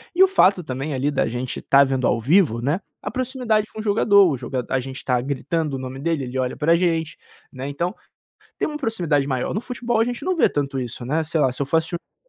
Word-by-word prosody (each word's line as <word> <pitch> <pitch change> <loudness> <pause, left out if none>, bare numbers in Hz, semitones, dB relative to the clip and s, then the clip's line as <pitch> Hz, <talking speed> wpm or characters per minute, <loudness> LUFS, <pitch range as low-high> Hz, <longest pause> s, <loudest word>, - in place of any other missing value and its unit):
e 375 - +7
o - - +7
fato 190 - +4
também 135 +2 -4
ali 140 +3 0
da 140 - +1
gente 125 +2 -4
tá 140 0 +5
vendo 130 -2 0
ao 120 - +1
vivo, 140 - +3
né, 145 +9 0 0.2
a 205 - -5
proximidade 245 -4 0
com 220 - -8
o - - -7
jogador, 200 -3 +5
o 135 - -1
joga 125 0 -4
a 135 - +1
gente 130 +1 -7
está 125 -2 0
gritando 145 +3 -2
o 130 - -4
nome 130 +1 -6
dele, 160 -2 -1
ele 125 +1 -5
olha 125 -1 -1
pra 160 +3 +3
gente, 165 -3 0 0.3
né, 130 +1 -6
então, 170 +6 -2 0.6
tem - - 0
uma 300 -1 -4
proximidade 170 - 0
maior. 130 +2 -1
No 210 - -1
futebol 240 -2 -2
a - - +5
gente 245 0 -4
não 370 - +1
vê - - +4
tanto 140 -2 -2
isso, 120 0 -6
né. 155 +5 0
Sei 160 0 -1
lá, 130 - +3
se 130 - -6
eu - - +1
for 160 +4 +2
assistir 165 +2 -1
o - - -1
jogo 170 - -36
150 Hz, 260 wpm, -22 LUFS, 130-200 Hz, 0.6 s, e